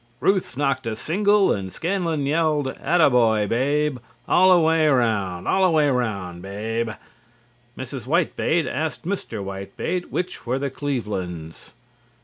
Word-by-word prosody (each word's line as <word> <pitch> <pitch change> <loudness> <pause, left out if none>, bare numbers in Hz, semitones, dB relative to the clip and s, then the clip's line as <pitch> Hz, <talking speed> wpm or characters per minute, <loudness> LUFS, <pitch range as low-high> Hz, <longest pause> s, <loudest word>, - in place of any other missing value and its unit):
Ruth 190 -10 0
knocked 135 -4 0
a 110 - -2
single 200 - +2
and 95 -2 -4
Scanlon 165 - -1
yelled 150 -2 +1
"Atta 160 +2 +2
boy, 110 -4 +3
Babe! 140 +5 0 0.3
All 185 +1 +5
er 180 - +7
way 160 -1 +3
'round! 105 -10 +1
All 190 - +2
er 185 - +5
way 155 -3 +3
round, 100 -9 -2
Babe!" 110 +4 -3 0.9
Mrs. 130 -1 -6
Whitebait 165 +1 +1
asked 155 +4 -3
Mr. 165 - -4
Whitebait 100 - -4
which 180 +1 -4
were 125 +2 0
the 140 0 -3
Clevelands. 95 - -5
135 Hz, 135 wpm, -23 LUFS, 110-165 Hz, 0.9 s, er